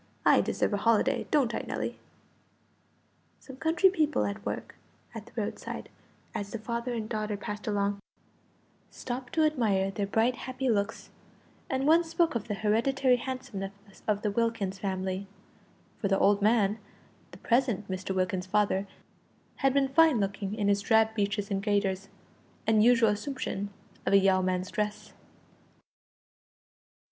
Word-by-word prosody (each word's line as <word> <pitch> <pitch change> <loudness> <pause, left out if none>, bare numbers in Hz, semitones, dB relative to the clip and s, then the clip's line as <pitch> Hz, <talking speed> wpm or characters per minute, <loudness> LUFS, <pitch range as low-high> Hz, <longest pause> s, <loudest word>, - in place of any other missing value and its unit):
I - - +6
deserve - - -1
a - - +2
holiday, 230 +4 +2
don't 275 -6 +2
I, - - -1
Nelly?" - - -3 1.4
Some 265 -1 -12
country 335 +6 +3
people 310 -6 +1
at 200 +1 -4
work - - -4 0.4
at - - -8
the - - -15
roadside, - - -5 0.4
as 205 -3 -4
the 230 - -4
father 235 +2 -3
and 220 -2 -3
daughter 215 -2 -2
passed 210 +2 -6
along, 200 -1 0 0.9
stopped 250 0 -6
to 315 -1 +3
admire 210 -10 +1
their 200 0 -2
bright 225 +5 +2
happy 255 0 -1
looks, 205 +1 -2 0.6
and 265 0 0
one 325 +3 +5
spoke 330 0 +1
of 235 -2 -3
the 210 - -2
hereditary 250 +5 +2
handsomeness 200 -6 -7
of 210 -1 0
the 210 - +1
Wilkins 205 -3 -1
family 190 0 -3 0.7
(for 205 - 0
the 195 0 +2
old 200 +1 +3
man, 210 0 +3 0.5
the - - -13
present 235 -5 +1
Mr. 190 0 -3
Wilkins's 185 0 -1
father, 200 -1 +1 0.7
had 270 -1 +3
been 275 0 +2
fine 315 -3 +5
looking 195 0 -2
in 210 -2 0
his 200 0 +3
drab 220 +2 +3
breeches 205 -1 -1
and 195 0 0
gaiters, 200 -2 0 0.6
and 215 -1 +4
usual 235 -2 +5
assumption 210 -2 -3 0.4
of - - +2
a - - +9
yeoman's 185 -1 +2
dress). 210 -1 -3
210 Hz, 145 wpm, -29 LUFS, 200-245 Hz, 1.4 s, a